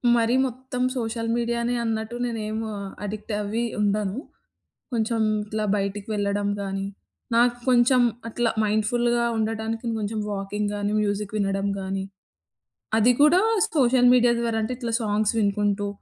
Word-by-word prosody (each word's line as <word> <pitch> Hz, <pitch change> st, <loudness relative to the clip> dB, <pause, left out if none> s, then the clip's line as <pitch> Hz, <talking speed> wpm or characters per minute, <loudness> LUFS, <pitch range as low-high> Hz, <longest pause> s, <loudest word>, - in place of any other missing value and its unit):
మరీ 230 Hz, +1 st, +2 dB
మొత్తం 255 Hz, 0 st, -6 dB, 0.2 s
సోషల్ 230 Hz, -1 st, -2 dB
మీడియానే 235 Hz, 0 st, 0 dB
అన్నట్టు 225 Hz, +1 st, -2 dB
నేనేం 220 Hz, -2 st, -3 dB, 0.4 s
అడిక్ట్ 210 Hz, +1 st, -5 dB
అవ్వి 210 Hz, +3 st, -2 dB, 0.2 s
ఉండను. 205 Hz, 0 st, 0 dB, 0.7 s
కొంచెం 225 Hz, -1 st, 0 dB, 0.2 s
ఇట్లా 215 Hz, +1 st, -3 dB
బయటికి 200 Hz, 0 st, -3 dB
వెళ్ళడం 205 Hz, 0 st, 0 dB
గానీ, 195 Hz, 0 st, -3 dB, 0.5 s
నాకు 240 Hz, +1 st, +4 dB
కొంచెం 250 Hz, +1 st, +5 dB, 0.3 s
అట్లా 230 Hz, 0 st, 0 dB
మైండ్‌ఫుల్‌గా 235 Hz, +3 st, +1 dB
ఉండటానికి 225 Hz, +1 st, -2 dB
కొంచెం 215 Hz, +1 st, -3 dB
వాకింగ్ 205 Hz, +1 st, -2 dB
గానీ, 205 Hz, 0 st, -1 dB
మ్యూజిక్ 205 Hz, 0 st, -2 dB
వినడం 195 Hz, -1 st, 0 dB
గానీ, 190 Hz, 0 st, -3 dB, 1.0 s
అది 240 Hz, +3 st, +5 dB
కూడా 320 Hz, +5 st, +6 dB, 0.3 s
సోషల్ 250 Hz, -4 st, +4 dB
మీడియా 245 Hz, -1 st, +5 dB
ద్వారా 230 Hz, -1 st, 0 dB
అంటే, 250 Hz, +3 st, -2 dB
ఇట్లా 235 Hz, -2 st, -4 dB
సాంగ్స్ 215 Hz, 0 st, +1 dB
వినుకుంటూ, 205 Hz, 0 st, +1 dB
220 Hz, 125 wpm, -24 LUFS, 205-235 Hz, 1.0 s, కూడా